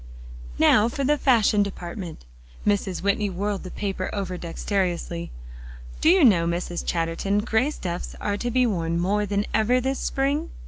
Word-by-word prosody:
"Now 210 +2 +5
for 275 +3 -3
the 295 +3 +3
fashion 230 -7 +3
department." 175 - -5 0.4
Mrs. 200 -3 0
Whitney 200 +1 +1
whirled 195 +1 -2
the 185 - -8
paper 190 -1 -3
over 195 -3 -3
dexterously. 175 -1 -2 0.7
"Do 315 - +5
you 355 -4 +6
know, 175 -8 +5
Mrs. 175 0 -2
Chatterton, 170 +4 -1
gray 225 +5 +1
stuffs 180 - -5
are 205 - -1
to 240 +4 -3
be 250 +1 +3
worn 170 -6 -1
more 205 +4 +1
than 200 +1 0
ever 225 +4 +3
this 265 +2 -1
spring?" 285 +4 -1
200 Hz, 155 wpm, -24 LUFS, 180-235 Hz, 0.7 s, you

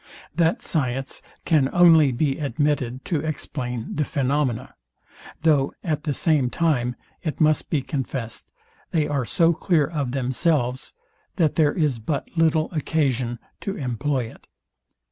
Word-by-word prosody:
That 165 +1 +1
science 135 -3 -1 0.2
can 150 -5 +3
only 165 -5 +6
be 135 +4 0
admitted 140 -4 -1
to 165 -5 0
explain 130 -6 -4
the 150 - +1
phaenomena; 140 -4 -1 0.7
though 145 -4 +3
at 155 -2 -2
the 150 - 0
same 150 -7 +2
time 125 -6 0 0.3
it 155 -4 -4
must 155 -1 +3
be 145 -4 0
confest, 130 -4 -4 0.4
they 155 -3 +1
are 140 -4 -1
so 165 +7 +3
clear 165 -2 +2
of 145 -5 -3
themselves, 130 0 0 0.4
that 160 -5 +2
there 150 -3 +3
is 150 -8 0
but 140 +7 -2
little 160 -1 +2
occasion 135 -7 0 0.2
to 195 - -4
employ 130 +1 -1
it. - - -19
145 Hz, 135 wpm, -23 LUFS, 130-160 Hz, 0.7 s, only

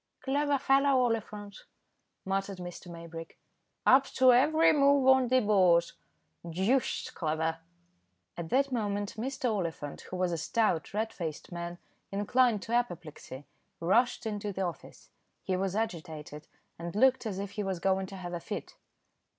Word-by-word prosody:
"Clever 285 +1 +1
fellow, 275 0 +3
Oliphant," 210 -3 -3 0.6
muttered 195 0 -2
Mr. 175 0 -8
Maybrick; 165 -1 -9 0.5
"up 265 +1 +6
to 255 -1 +6
every 310 +6 +5
move 280 -2 +4
on 265 -1 +6
the 255 +1 +4
board. 185 -5 +4 0.6
Deuced 195 +10 0
clever!" 160 0 -1 0.8
At 170 -2 -6
that 275 +1 +2
moment 205 -4 -2
Mr. 250 0 -2
Oliphant, 165 -7 -4
who - - -5
was 180 -1 0
a 170 - -2
stout, 215 - 0
red 220 +1 -1
faced 160 -2 -6
man, 170 0 -5 0.3
inclined 210 +2 +2
to 230 - -5
apoplexy, 170 - -3 0.3
rushed 230 +9 +2
into 210 -1 -3
the 190 0 -3
office. 170 -5 -7 0.3
He 185 - -1
was 190 +1 -1
agitated, 160 -8 -4 0.3
and 170 +1 -6
looked 260 +1 +3
as 195 -3 -4
if 200 0 -4
he 210 - -4
was 190 -3 -2
going 190 +1 +1
to 195 - -9
have 175 -1 -6
a 175 - -2
fit. - - -7
200 Hz, 150 wpm, -30 LUFS, 175-245 Hz, 0.8 s, up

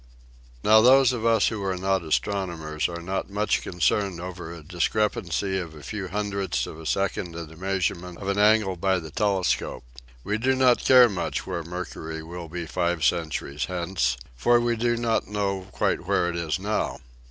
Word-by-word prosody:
Now 110 +1 +7
those 130 +1 +6
of 115 -2 -1
us 115 -3 +4
who 110 -3 -4
are 95 -1 -1
not 95 +1 +1
astronomers 80 -2 -1
are 85 -1 -6
not 95 +3 -3
much 105 +2 0
concerned 90 +1 0
over 90 -2 -7
a 85 -2 -9
discrepancy 95 +2 0
of 85 -3 -7
a 75 - -12
few 95 +8 -5
hun 105 +2 -2
dredths 95 -10 -1
of 80 - -9
a 80 - -7
second 95 -2 -1
in 85 -1 -6
the 80 - -13
measurement 90 -1 -2
of 95 - -7
an 100 +1 0
angle 105 -2 +4
by 95 +2 +1
the 80 -3 -7
telescope. 100 +1 0 0.4
We 105 +7 -1
do 130 +3 +2
not 130 -2 +4
care 125 -2 +8
much 100 -5 -3
where 90 -3 -3
Mercury 80 -2 -6
will 85 0 -8
be 85 +1 -5
five 85 -1 -1
centuries 80 -3 0
hence, 85 -8 -1 0.2
for 120 - +4
we 120 0 +1
do 120 +1 +1
not 115 -1 0
know 100 -2 -2
quite - - -1
where 85 - +2
it - - -6
is 85 -2 -1
now. 105 +3 -2
95 Hz, 185 wpm, -25 LUFS, 85-105 Hz, 0.4 s, care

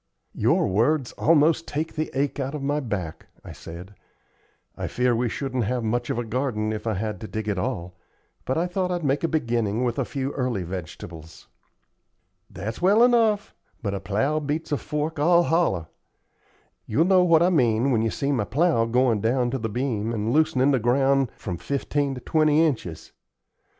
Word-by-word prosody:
"Your - - +2
words 120 +7 +1
almost 160 +1 +3
take 155 +3 -3
the 155 0 -2
ache 140 +1 -1
out 135 +2 -3
of 145 - -5
my 145 +2 0
back," 100 - -5 0.2
I - - -8
said. 90 +4 -10 0.8
"I - - -4
fear 125 -1 +1
we 120 +1 0
shouldn't 130 -2 -2
have 125 +2 -1
much 120 +2 -1
of - - -1
a 120 - -1
garden 110 -2 -2
if 110 +1 -5
I 110 - 0
had 105 +3 -4
to 110 - -6
dig 110 0 -5
it 100 -3 -1
all, 90 0 -3 0.5
but 130 - -1
I 170 - +1
thought 180 +1 -1
I'd 175 -2 -2
make 140 +1 0
a - - +3
beginning 120 -7 0
with 120 -2 -1
a - - +2
few 135 -1 -3
early 125 -9 -2
vegetables." 85 -2 -8 1.0
"That's 110 - -6
well 205 +6 +5
enough, 225 -4 +3 0.3
but 100 -2 -1
a 100 - -2
plow 110 +11 0
beats 155 +2 -3
a 145 - +2
fork 150 +2 -3
all 170 +3 +5
hollow. 160 - +1 1.0
You'll 150 +10 +2
know 185 -1 +5
what 170 -2 +5
I 180 - +3
mean 125 -4 +2
when 115 -3 +2
you 115 - +1
see 140 +5 -2
my 120 -7 0
plow 145 0 +2
going 120 -2 +2
down 120 +2 +1
to 135 - -2
the 115 - -3
beam 115 -1 -2
and 110 +1 -1
loosenin' 150 -3 +3
the 135 - +2
ground 135 +2 +2
from 90 -4 -5
fifteen 140 - -2
to 125 - -8
twenty 155 +3 +3
inches. 110 - -3
130 Hz, 190 wpm, -24 LUFS, 110-155 Hz, 1.0 s, well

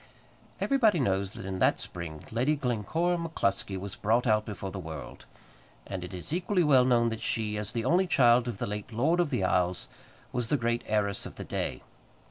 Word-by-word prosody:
Everybody 230 - +3
knows 100 -5 0
that 115 -4 -8
in 95 -1 -4
that - - +3
spring 80 -3 -6
Lady 125 +7 +2
Glencora 145 - 0
MacCluskie 100 - -1
was 100 0 -6
brought 115 +4 +1
out 110 -2 +3
before 100 -2 -5
the 95 - -5
world, 80 -4 -8 0.6
and 95 -2 -5
it 90 - -7
is 90 - -6
equally 180 +1 +1
well 135 -5 +5
known 120 -2 +3
that 115 -1 -5
she, 110 -2 -1
as 105 -1 -3
the 115 -1 -2
only 180 +6 +3
child 120 -6 +5
of 120 -4 -3
the - - -2
late 105 +3 -5
Lord 145 +10 +2
of 175 -4 +2
the 125 -9 0
Isles, 90 -1 +1 0.4
was 120 -2 -2
the 145 - +3
great 120 -1 0
heiress 105 -2 0
of - - -12
the - - -6
day. - - -3
115 Hz, 200 wpm, -29 LUFS, 100-140 Hz, 0.6 s, well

